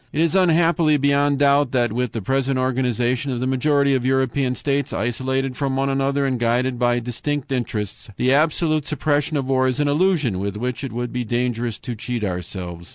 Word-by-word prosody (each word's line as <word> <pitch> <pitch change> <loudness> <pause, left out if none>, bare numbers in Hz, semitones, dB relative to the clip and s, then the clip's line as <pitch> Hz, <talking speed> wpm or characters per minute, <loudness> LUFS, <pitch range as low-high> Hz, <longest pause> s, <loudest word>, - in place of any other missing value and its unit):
"It 150 - -3
is 165 0 +2
unhappily 165 -4 +3
beyond 140 0 +2
doubt 140 -1 +3
that 120 -4 +1
with 125 0 -2
the 115 - -4
present 135 +3 0
organization 125 0 0
of 125 - -2
the 125 - -1
majority 140 +2 +2
of 130 -2 0
European 130 0 +1
states, 140 +1 -1
isolated 130 +3 -1
from 135 0 -1
one 135 +1 0
another 135 +1 0
and 130 -2 -1
guided 120 +2 0
by 120 -1 +2
distinct 135 +4 -4
interests, 110 -7 -3
the 130 +1 +2
absolute 155 0 +1
suppression 150 0 0
of 135 - -1
war 130 0 +2
is 130 +1 -1
an 145 - +2
illusion 150 - +1
with 100 +1 -3
which 125 +3 -3
it 135 - -4
would 120 +1 -4
be 125 0 -1
dangerous 120 -1 -2
to 125 -2 -6
cheat 120 0 -4
ourselves. 90 -2 -5
130 Hz, 195 wpm, -21 LUFS, 120-140 Hz, -, unhappily